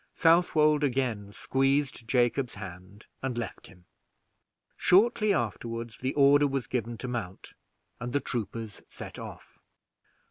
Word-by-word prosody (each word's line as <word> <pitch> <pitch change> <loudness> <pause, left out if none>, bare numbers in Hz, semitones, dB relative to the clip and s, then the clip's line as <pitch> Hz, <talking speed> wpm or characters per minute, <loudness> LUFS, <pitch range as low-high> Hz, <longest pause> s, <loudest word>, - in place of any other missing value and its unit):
Southwold 155 -3 +4
again 120 -7 -1
squeezed 135 +1 0
Jacob's 125 +1 +1
hand, 100 +1 -10 0.2
and 130 -2 -3
left 115 -5 -5
him. 90 -2 -18 0.9
Shortly 210 +4 +4
afterward 115 - -2
the 130 +1 -1
order 145 0 +6
was 135 -2 -2
given 120 -2 -3
to 125 - -6
mount, 115 -7 -5 0.5
and 120 0 -4
the 145 - +2
troopers 115 -4 -5
set - - -9
off. - - -10
125 Hz, 120 wpm, -29 LUFS, 115-145 Hz, 0.9 s, order